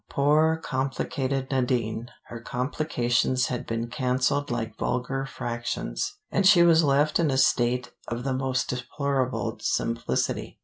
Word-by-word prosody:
Poor 155 +3 +3
complicated 135 -1 -2
Nadine! 125 -3 -1 0.2
Her 115 0 -9
complications 125 -1 0
had 125 -1 -4
been 115 0 -2
canceled 130 +2 0
like 115 -2 -3
vulgar 135 +2 -2
fractions, 120 - -3 0.2
and 195 - +2
she 190 -3 +7
was 165 -1 +5
left 145 +2 +3
in 165 -3 +2
a 135 - +1
state 125 -1 +2 0.2
of 120 +1 -4
the 135 0 -1
most 130 -1 -1
deplorable 125 -3 -2
simplicity. 115 - -1
130 Hz, 130 wpm, -26 LUFS, 120-140 Hz, 0.2 s, she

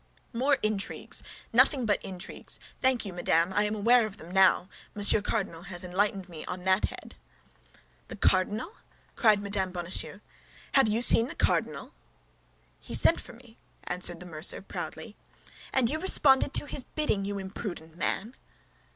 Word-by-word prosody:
"More 270 +4 +1
intrigues! 215 -2 -2 0.3
Nothing 265 -5 +3
but 205 -2 0
intrigues! 185 -1 -6 0.2
Thank 260 -3 +1
you, 195 - -6
madame, 175 0 +1
I 205 +2 +2
am 210 +1 -2
aware 230 +2 +3
of 205 - -12
them 165 +2 -12
now; 190 -1 +3 0.3
Monsieur 205 +1 +4
Cardinal 200 -6 -3
has 175 -1 -7
enlightened 195 +1 -1
me 165 -4 -9
on 180 0 -6
that 190 +2 +2
head." - - -9 0.9
"The - - -8
cardinal?" 210 - 0 0.4
cried 215 -3 +3
Mme. 200 -2 -1
Bonacieux. 175 0 -5 0.5
"Have 270 -4 +4
you 220 +3 +3
seen 230 -1 +8
the - - -9
cardinal?" - - -1 0.9
"He - - -6
sent 330 - +5
for - - -11
me," 235 -1 -18 0.3
answered 175 -1 -3
the 180 - -9
mercer, 160 0 -1
proudly. - - -7 0.6
"And 260 -3 +2
you 310 +6 -2
responded 285 -6 +5
to - - +3
his 280 - 0
bidding, 270 -11 -2
you 200 0 -4
imprudent 190 -4 -7
man?" 205 +6 -3
205 Hz, 155 wpm, -28 LUFS, 185-235 Hz, 0.9 s, seen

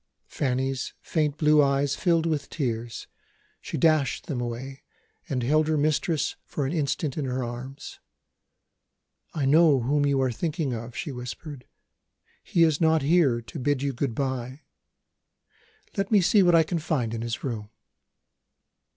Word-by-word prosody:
Fanny's 130 0 -2
faint 150 -3 -1
blue 150 -1 +5
eyes 140 0 +2
filled 170 -2 +2
with 155 -4 -1
tears. 120 -5 -3 0.6
She - - -5
dashed 155 -4 +2
them 125 -4 -3
away, 125 +3 -5 0.5
and 125 -3 -1
held 155 +5 +2
her 155 -1 +1
mistress 155 +1 0
for 145 - -3
an 135 - -2
instant 150 -2 -1
in 145 - -1
her 130 0 -2
arms. 120 +3 -7 1.4
"I 145 -4 0
know 150 -1 +5
whom 145 +4 +1
you 140 -1 +2
are 130 - +1
thinking 155 +1 -2
of," 115 +1 -6
she 150 - -4
whispered. 125 +2 -8 0.8
"He 170 - +2
is 160 -1 +2
not 160 -2 +3
here 140 -6 +3
to - - -8
bid 140 +1 0
you 140 -1 -1
good 120 -1 -2
bye. 130 0 -3 1.3
Let 195 0 -1
me 210 - +5
see 195 +3 +4
what 175 -2 +5
I 165 - +6
can 165 +2 -2
find 140 -8 -1
in 115 - -3
his 115 -1 -4
room." 110 -5 -4
140 Hz, 155 wpm, -26 LUFS, 125-155 Hz, 1.4 s, I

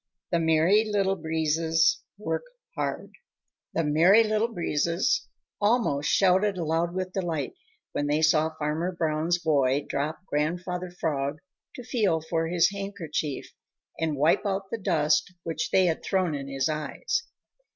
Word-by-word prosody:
XVI - - -62
THE 170 - +2
MERRY 165 +7 +4
LITTLE 200 -2 +1
BREEZES 160 0 +1 0.2
WORK 210 - -2 0.3
HARD - - -3 0.6
The 165 - +2
Merry 170 +9 +5
Little 215 +1 +1
Breezes 170 -2 0 0.3
almost 205 - +2
shouted 190 +1 +3
aloud 165 +1 -1
with 185 0 -3
delight 175 - -2 0.4
when 145 - -1
they 150 +2 +1
saw 155 0 +4
Farmer 160 +4 -1
Brown's 165 0 0
boy 140 -4 +1
drop 155 +5 -3
Grandfather 180 +4 -2
Frog 145 -5 -2 0.4
to 250 - -8
feel 210 -9 +1
for 165 +1 -2
his 175 +2 +3
handkerchief 190 -8 -4 0.5
and 160 -3 -1
wipe 150 +4 +3
out 195 -1 -2
the 230 - -3
dust 170 -1 +1
which 165 +8 -3
they 190 - +4
had 165 -2 0
thrown 185 -4 0
in 140 -1 -4
his 135 -1 -1
eyes. 300 - -2
165 Hz, 140 wpm, -27 LUFS, 155-190 Hz, 0.6 s, Merry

